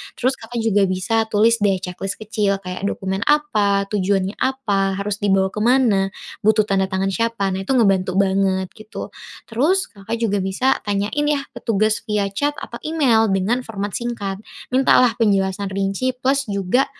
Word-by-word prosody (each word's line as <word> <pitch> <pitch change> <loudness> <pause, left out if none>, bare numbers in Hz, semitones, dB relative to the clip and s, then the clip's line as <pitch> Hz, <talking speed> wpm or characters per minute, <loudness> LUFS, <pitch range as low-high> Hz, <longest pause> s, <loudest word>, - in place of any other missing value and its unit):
Terus 260 +2 -1
Kakak 230 0 -5
juga 205 -3 +3
bisa 220 +5 0
tulis 220 +2 +3
deh 200 -2 +3
checklist 185 +2 -4
kecil 205 -2 -1
kayak 180 +2 -4
dokumen 190 -1 -3
apa? 215 -10 +2
Tujuannya 195 -1 0
apa? 205 -8 0
Harus 200 +1 -2
dibawa 195 -1 +2
kemana? 210 -3 +2 0.3
Butuh 215 0 +5
tanda 195 -1 +2
tangan 190 0 -1
siapa? 230 -1 -1
Nah 190 +1 -3
itu 265 - 0
ngebantu 195 -6 +2
banget 190 -1 +1
gitu. 215 0 -8 0.4
Terus, 330 +12 +1
Kakak 205 +2 -8
juga 205 -3 +1
bisa 195 +8 +1
tanyain 205 +8 -1
ya 295 -1 +1 0.2
petugas 215 -1 0
via 210 -3 0
chat 290 +9 -1
atau - - -8
email 270 -9 +3
dengan 225 +7 0
format 205 -2 -4
singkat. 205 -5 -4 0.3
Mintalah 250 -2 +4
penjelasan 195 -3 +1
rinci 195 +6 -1
plus 270 +2 0
juga, 200 +4 +1
205 Hz, 155 wpm, -20 LUFS, 195-235 Hz, 0.4 s, Butuh